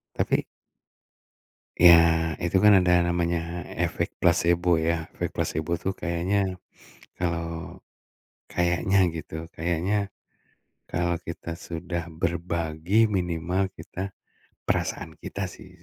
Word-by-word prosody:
Tapi - - +1 1.3
Ya 85 -1 +6
itu 85 +2 +2
kan 105 - +8
ada 90 - +3
namanya 85 0 +1 0.5
efek - - -2
plasebo 85 +1 +3 0.2
ya, 85 -1 0
efek - - -2
plasebo 80 +2 -2
tuh 95 - 0
kayaknya 90 +3 0 0.6
kalau 85 -1 -1 1.1
kayaknya 90 +2 +1 0.2
gitu, 80 -2 -7 0.2
kayaknya 85 +5 0 1.0
kalau 85 0 0
kita 85 0 -5
sudah 85 0 -4 0.2
berbagi 85 +4 +1
minimal 90 +1 0
kita 95 +1 -6 0.6
perasaan 80 - -1
kita 100 - -5
sih - - -13
85 Hz, 100 wpm, -26 LUFS, 85-90 Hz, 1.3 s, kan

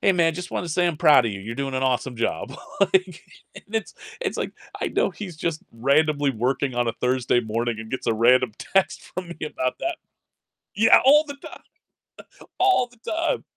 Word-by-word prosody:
"Hey, 195 - +4
man, 165 -2 +3
just 180 +3 -7
wanted 175 - -3
to - - -2
say 175 +2 +2
I'm 170 -3 -1
proud 150 -7 +5
of 105 - -2
you. 100 - -6
You're 110 +4 -6
doing 135 +1 -3
an 130 - -1
awesome 125 -2 0
job," 125 +3 -2 0.3
like, 185 -3 +1 0.3
and 215 - -13
it's 220 - -2 0.3
it's - - -2
like - - -3 0.3
I - - -1
know - - +1
he's 185 -6 -8
just 165 0 -2
randomly 145 +4 +2
working 130 +2 -1
on 120 -1 0
a 115 - 0
Thursday 125 -1 +1
morning 115 0 -2
and 110 0 -8
gets 130 - -4
a 115 - +2
random 120 +1 +4
text 195 -1 0
from 185 -2 -5
me 170 - -8
about 130 -4 -2
that. 340 -1 -2 0.8
Yeah, 220 +2 +6
all 295 +3 +7
the 285 -1 -7
time. - - -12 1.0
All 375 -10 +4
the 245 - -23
time. 330 +8 -2
145 Hz, 205 wpm, -24 LUFS, 120-185 Hz, 1.0 s, all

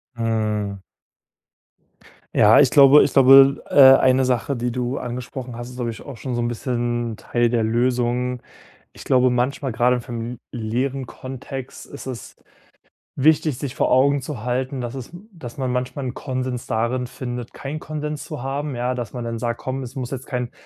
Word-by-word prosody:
Mhm. 110 -3 -2 1.5
Ja, 105 +1 +6
ich 140 -3 +6
glaube 140 +1 +7
ich - - 0
glaube, 135 +1 +7
äh, - - -9 0.2
eine 130 0 +3
Sache, 130 +2 0
die 120 0 -2
du 125 +2 -2
angesprochen 125 0 -6
hast, 120 +1 -7
ist, 125 - -11
glaub 120 -2 -2
ich, 115 - -8
auch 140 - -9
schon 125 +3 -4
so 120 - -1
'n 120 - 0
bisschen 120 -1 -2
Teil 120 +1 0
der 115 -1 +1
Lösung. 125 +2 0 0.5
Ich - - -12
glaube, 130 -1 +3
manchmal- 130 +2 -1
grade 120 +3 +2
im 125 - -3
familiären 120 +2 -4
Kontext- 130 +1 -8
ist - - -10
es 130 -3 -8 0.8
wichtig, 150 -1 +2
sich 135 -2 -5
vor - - 0
Augen 140 +2 +4
zu 130 -4 -6
halten, 130 +2 -2
dass 120 -1 -4
es 130 0 -8 0.2
dass 125 -9 -10
man 130 -2 -2
manchmal 125 +2 -3
'n 125 - -3
Konsens 130 -2 -4
darin 120 +3 -1
findet, 125 -1 -6
keinen 145 +3 -6
Konsens 150 -1 -5
zu 150 -6 -7
haben, 140 +1 -3
ja, 125 +1 -1
dass 120 -4 -5
man 125 -2 -5
dann 115 -1 -4
sagt: 120 0 -2
„Komm, 130 +1 -4
es 130 -1 -8
muss 130 -2 -5
jetzt 135 0 -6
kein“ 125 -3 -3
125 Hz, 180 wpm, -22 LUFS, 120-135 Hz, 1.5 s, glaube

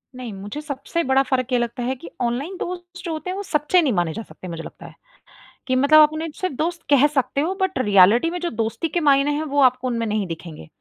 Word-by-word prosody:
नहीं, 250 -3 -7
मुझे 205 +9 -7
सबसे 300 +3 -3
बड़ा 265 +1 +3
फ़र्क 260 -1 -1
ये - - +4
लगता 240 +1 -3
है 255 +2 -1
कि 170 -9 -11
ऑनलाइन 260 +10 -2
दोस्त 355 0 -7
जो 335 - -3
होते 315 +3 -5
हैं, 370 - -3
वो 405 - -4
सच्चे 325 0 +2
नहीं 280 -7 +1
माने 175 -4 0
जा 225 - -5
सकते 185 - -12
मुझे 165 -2 -6
लगता - - -11
है, - - -12 0.7
कि 255 - +1
मतलब 280 +4 +6
आप 305 -1 +7
अपने 310 +1 -4
सिर्फ 370 -5 -3
दोस्त 335 +2 -2
कह 285 -1 +6
सकते 275 +1 +1
हो, 345 +5 -1
बट 380 -5 0
रियलिटी 210 - +5
में 355 +1 -4
जो 350 - -1
दोस्ती 225 +6 -2
के 345 - -1
मायने 285 -2 +3
हैं, 295 +2 -1
वो 285 -2 -1
आपको 255 -1 +3
उनमें 230 -2 -1
नहीं 210 -2 -1
दिखेंगे। 165 - -8
270 Hz, 250 wpm, -22 LUFS, 230-320 Hz, 0.7 s, आप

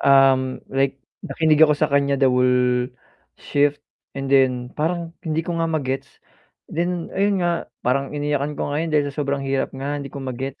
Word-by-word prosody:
Um, 135 -1 +4
like 135 0 +1 0.2
nakinig 155 -1 +1
ako 150 -1 +7
sa 155 - +1
kanya 140 0 +3
the 135 -1 +4
whole 125 0 +2 0.5
shift 145 0 0 0.3
and 135 0 -3
then 125 -2 +3
parang 165 +2 -2
hindi 160 0 -2
ko 175 - -3
nga 165 - +2
ma-gets. 135 -4 -2 0.6
Then, 175 +1 -2
ayun 195 -2 +1
nga, 170 -1 -1 0.2
parang 140 +3 0
iniyakan 145 0 -1
ko 145 - -3
yun 160 +3 -1
dahil 145 -2 +1
sa - - -21
sobrang 140 -1 -1
hirap 135 0 0
nga 145 +2 -3
hindi 140 - -6
ko 140 +1 -8
ma-gets 135 +2 -5
140 Hz, 175 wpm, -22 LUFS, 135-155 Hz, 0.6 s, ako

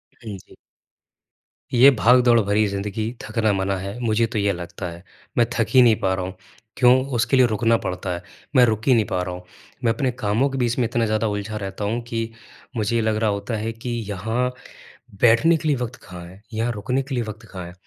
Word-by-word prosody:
हाँ 110 -5 -8
जी। - - -18 1.2
ये 130 +3 +8
भाग-दौड़ 120 +1 +5
भरी 105 +1 +2
ज़िंदगी 105 +3 -3
थकना 110 0 0
मना 95 0 0
है, 100 +5 -6
मुझे 115 -1 +1
तो 110 -2 -3
ये 100 0 +2
लगता 90 +1 -7
है। 85 +2 -11 0.3
मैं 120 - +5
थक 115 - +2
ही 130 - +6
नहीं 115 -3 +6
पा 95 0 +1
रहा 95 -1 -2
हूँ 95 - -6 0.4
क्यों? 130 +1 +5
उसके 125 +3 +2
लिए 130 - +6
रुकना 115 +1 +2
पड़ता 90 -2 -4
है, 85 - -5 0.3
मैं 125 -1 +7
रुक 110 +2 -1
ही 130 - +6
नहीं 110 -3 +3
पा 90 - -2
रहा 90 0 -5
हूँ। 90 - -10 0.4
मैं 115 -1 +3
अपने 130 -3 -1
कामों 110 +7 +1
के 135 - -4
बीच 120 -1 0
में 120 - +3
इतना 115 0 0
ज़्यादा 110 +1 0
उलझा 105 +1 -3
रहता 100 0 -5
हूँ 115 +3 -1
कि 115 -1 -3 0.5
मुझे 110 +2 0
ये 115 - +2
लग 110 -1 +1
रहा 110 -1 +1
होता 100 +3 -3
है 110 +2 -3
कि 115 +2 -7 0.2
यहाँ 110 +6 -1 0.7
बैठने 125 +8 +5
के 155 0 -3
लिए 145 - +3
वक़्त 125 +1 -4
कहाँ 90 -1 -9
है, 95 +4 -15
यहाँ 115 +2 -1
रुकने 125 +5 -1
के 135 0 -6
लिए 120 -2 0
वक़्त 110 +1 -9
कहाँ 90 -2 -6
है? 85 - -10
110 Hz, 225 wpm, -22 LUFS, 100-120 Hz, 1.2 s, ये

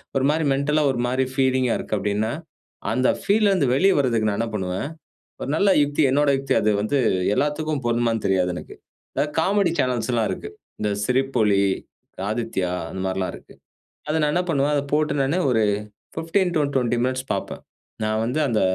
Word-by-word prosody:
ஒரு 135 -1 +2
மாதிரி 160 +1 0
மென்டல்லா 150 +2 +1
ஒரு 120 - -3
மாதிரி 130 +1 +1
ஃபீலிங்கா 130 -2 +2
இருக்கு - - -3
அப்படின்னா, 105 +3 -1 0.6
அந்த 130 +3 +2
ஃபீல்ல 210 0 +3
இருந்து 155 -10 +2
வெளியே 195 +8 +4
வரதுக்கு 115 -5 +1
நான் 100 - -2
என்ன 115 0 -1
பண்ணுவேன். 95 +6 -2 0.6
ஒரு - - -3
நல்ல 200 +3 +3
யுக்தி, 145 +1 +1
என்னுடைய 140 -1 +3
யுக்தி 135 -1 -1
அது 105 - +3
வந்து 135 +6 0 0.4
எல்லாத்துக்கும் 150 -1 -1
பொருந்துமான்னு 115 -2 0
தெரியாது 90 -2 +1
எனக்கு. - - -9 0.4
அதாவது 150 +1 -1
காமெடி 190 0 +2
சேனல்ஸ் 125 -2 0
எல்லாம் 115 -2 +1
இருக்கு. - - -6 0.3
இந்த 105 - 0
சிரிப்பொலி, 125 -6 +2 0.7
ஆதித்யா 110 -6 -2 0.2
அந்த 95 - -5
மாதிரி 95 0 -2
எல்லாம் 90 -1 -2
இருக்கு. - - -16 0.6
அத 155 - 0
நான் 150 0 +1
என்ன 180 0 +1
பண்ணுவேன், 145 0 +1
அதை 140 -1 0
போட்ட 150 -1 +1
உடனே 145 +7 +1
ஒரு 115 -2 +3 0.5
15 175 +2 0
டூ 150 - +3
20 120 -2 +1
மினிட்ஸ் 130 +1 -2
பார்ப்பேன். - - -5 0.4
நான் 110 0 0
வந்து 125 +6 -1
அந்த, 110 -2 +1
130 Hz, 175 wpm, -23 LUFS, 110-150 Hz, 0.7 s, வெளியே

